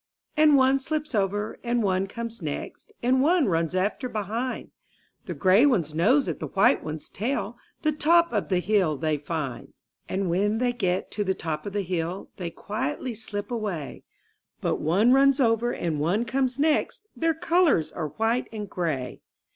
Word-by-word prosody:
And 305 -1 +6
one 265 +1 +4
slips 305 +1 -3
over, 205 +1 -1
and 240 -1 0
one 190 -1 +1
comes 230 +1 -6
next. 150 -3 -6
And 260 +2 +3
one 330 +2 +4
runs 165 -3 0
after 205 +7 -1
behind; 225 +4 -3 0.6
The - - -4
gray 190 +5 +5
one's 175 - +1
nose 235 - +3
at - - -3
the - - -4
white 195 - +3
one's 155 0 -6
tail. 230 0 -3 0.2
The 310 - +3
top 335 +2 +3
of 210 - -1
the 185 - +2
hill 185 -7 +2
they 155 0 -1
find. 145 -5 -5 0.4
And 190 0 -1
when 200 +5 +1
they 245 +1 +1
get 185 -6 -1
to 210 - -1
the 190 -1 0
top 155 +1 -4
of 200 - -5
the 205 -1 -1
hill, 175 +1 -3
They 175 -3 -4
quietly 250 - -4
slip 210 0 -6
away; 200 - -4 0.6
But - - 0
one 200 +10 +4
runs 275 +1 +5
over 235 -1 +2
and 160 -8 -2
one 185 +10 +1
comes. 260 +1 0
next 310 +7 +1
— - - -48
Their 325 -1 +1
colors 330 - +2
are 160 -3 -3
white 225 - -1
and 210 -2 -5
gray. 155 -9 -3
210 Hz, 180 wpm, -26 LUFS, 180-260 Hz, 0.6 s, And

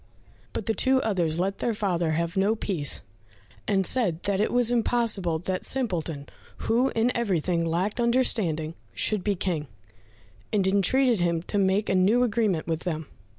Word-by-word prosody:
But 215 - -4
the 225 - +1
two 260 +3 +2
others 175 -7 0
let 195 +2 -1
their 235 -2 -1
father 175 -6 0
have 170 +1 -2
no 200 +3 +2
peace, 175 -9 -1 0.6
and 195 -1 +2
said 185 -10 0
that 200 0 0
it 215 - +1
was 245 -1 +2
impossible 225 -8 +1
that 185 +3 -3
Simpleton, 170 - -2 0.4
who 245 +4 +2
in 230 +2 +1
everything 180 -7 0
lacked 180 +7 -1
understanding, 215 -10 +1 0.2
should 210 -4 0
be 205 -1 +1
King, 170 -5 -2 0.8
and 200 -3 +1
entreated 210 +5 +3
him 170 -1 0
to 205 - -1
make 195 +2 +2
a - - +1
new 200 +7 +4
agreement 215 -8 0
with 160 -1 -2
them. 160 -3 -4
195 Hz, 160 wpm, -26 LUFS, 170-225 Hz, 0.8 s, new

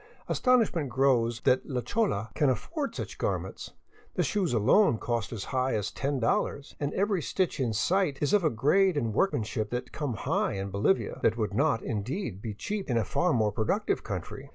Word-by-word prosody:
Astonishment 225 - +2
grows 120 -2 +2
that 130 - +3
la 130 -3 -3
chola 120 - -1
can 145 -3 +2
afford 285 - -2
such - - -6
garments. - - -3 0.4
The - - +2
shoes 195 -6 0
alone 120 - +4
cost 115 -1 -2
as 110 -5 -4
high 130 0 +1
as 105 -2 -2
$io, 135 -1 0 0.2
and 145 0 -1
every 200 -2 +1
stitch 185 0 -1
in 125 -4 +1
sight 170 - +1
is 145 +6 0
of 205 -3 +4
a 155 - +4
grade 150 - +3
and 115 -6 -1
workmanship 110 - 0
that 125 +1 -4
come 145 -6 -3
high - - 0
in 100 0 -4
Bolivia, 100 - +1
that 110 - +3
woul^ 110 -3 -2
not, 140 0 +1
indeed, 115 - -3
be 105 -2 -5
cheap 200 - -4
in 120 - +2
a 110 - +1
far 175 +10 +1
more 110 -6 +2
productive 110 +1 0
country. - - -6
130 Hz, 185 wpm, -28 LUFS, 110-180 Hz, 0.4 s, alone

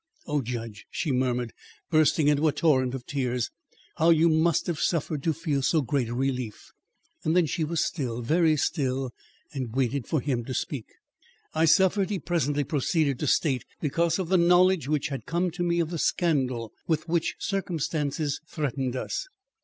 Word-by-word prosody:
"Oh, 150 -2 0
judge!" 115 -3 -6
she 155 - -2
murmured, 125 -2 0 0.4
bursting 155 -1 +4
into 150 +1 +3
a - - +4
torrent 130 -5 +2
of 125 -2 -7
tears. 125 -4 -1 0.5
"How 165 +2 +4
you 165 0 +5
must 160 +1 +2
have 170 -3 -2
suffered 155 -3 0
to 160 - +1
feel 155 -3 -1
so 145 +3 +2
great 130 -3 0
a 120 - -3
relief!" 125 -4 -3 0.5
Then 165 +2 +3
she 160 +2 -1
was 165 +1 0
still, 125 -9 -3
very 160 +4 +3
still, 135 -4 -1 0.4
and 130 -5 -4
waited 135 -1 0
for 155 - +1
him 125 -3 -1
to 130 - -4
speak. 135 -7 -3 0.7
"I 160 +1 +3
suffered," 190 +4 +4
he 205 - -1
presently 145 -3 0
proceeded 145 0 0
to 150 - -1
state, 135 -4 +2 0.2
"because 165 +3 +1
of 185 -3 -3
the 190 - +4
knowledge 180 -3 +4
which 150 +1 0
had 135 -2 -6
come 175 +1 0
to 175 +2 -6
me 170 0 +1
of 165 -1 0
the 170 - -3
scandal 130 -11 0
with 160 0 0
which 170 0 0
circumstances 155 -6 -2
threatened 135 -4 -2
us. 130 - -3
150 Hz, 175 wpm, -27 LUFS, 130-165 Hz, 0.7 s, you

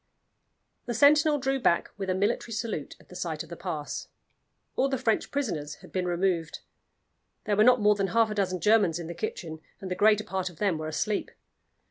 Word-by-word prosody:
The 240 - -2
sentinel 300 +3 +5
drew 270 0 0
back 170 -8 +2
with 195 -2 -4
a 185 - +1
military 210 +4 0
salute 225 +1 -4
at - - -22
the - - -12
sight - - -3
of - - -15
the - - -6
pass. - - -5 0.7
All 270 - +2
the 265 - 0
French 225 -2 0
prisoners 165 - -3
had - - -16
been 185 -1 -1
removed; 175 -2 -1 0.8
there 210 - 0
were 210 - +5
not 250 0 +5
more 210 0 +5
than 200 -1 -1
half 225 +3 +2
a - - -1
dozen 185 -3 -1
Germans 210 -6 +4
in 170 - -6
the 170 - -6
kitchen, 165 -4 -5 0.2
and 190 -2 -7
the - - 0
greater 210 +2 +4
part 190 -2 -3
of 175 - -16
them 195 -6 0
were 155 - -4
asleep. 200 +6 -1
205 Hz, 205 wpm, -28 LUFS, 180-225 Hz, 0.8 s, sentinel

